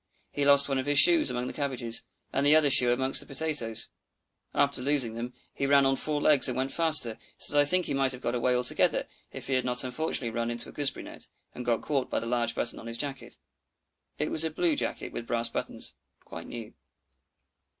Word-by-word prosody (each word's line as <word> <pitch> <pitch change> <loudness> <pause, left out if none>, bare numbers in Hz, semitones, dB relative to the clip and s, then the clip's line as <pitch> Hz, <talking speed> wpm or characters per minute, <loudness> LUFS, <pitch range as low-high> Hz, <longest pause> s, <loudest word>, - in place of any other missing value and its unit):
He 145 - -2
lost 140 0 +6
one 135 -1 -1
of 130 - -4
his 145 0 +3
shoes 170 -1 +6
among 125 0 -3
the - - -6
cabbages, 125 -5 -1 0.3
and 135 - 0
the 145 +2 +5
other 150 -3 +4
shoe 125 -1 +6
among 130 +2 -1
the - - +4
potatoes. 135 -6 -1 0.6
After 140 -2 +1
losing 130 -4 0
them, 120 +2 -7 0.2
he 140 - -2
ran 140 0 +4
on 135 0 +2
four 150 +1 -1
legs 145 -2 +5
and 125 -1 -3
went 135 +1 -2
faster, 155 -9 +2 0.2
so - - +2
that 145 - +3
I 145 - +4
think 180 +4 +3
he - - -2
might 135 -1 0
have 125 - -5
got - - -2
away 125 +1 0
altogether 125 0 +1 0.3
if - - -8
he 135 - -3
had 130 -1 +1
not 125 0 -1
unfortunately 130 -2 -2
run 115 0 -3
into 120 0 -3
a - - -11
gooseberry 140 -2 -2
net, - - -10 0.3
and 125 - -7
got 120 -2 -1
caught 140 -4 -2
by - - -1
the - - -7
large 120 -1 -1
buttons 120 - -2
on 115 - -10
his 115 0 -4
jacket. 140 0 -6 0.8
It 150 - -3
was 160 - +1
a 160 - -1
blue 160 0 0
jacket 120 - -4
with 115 - -7
brass 115 0 0
buttons, - - -5 0.3
quite 85 0 -10
new. 115 -3 -9
130 Hz, 225 wpm, -27 LUFS, 120-145 Hz, 0.8 s, lost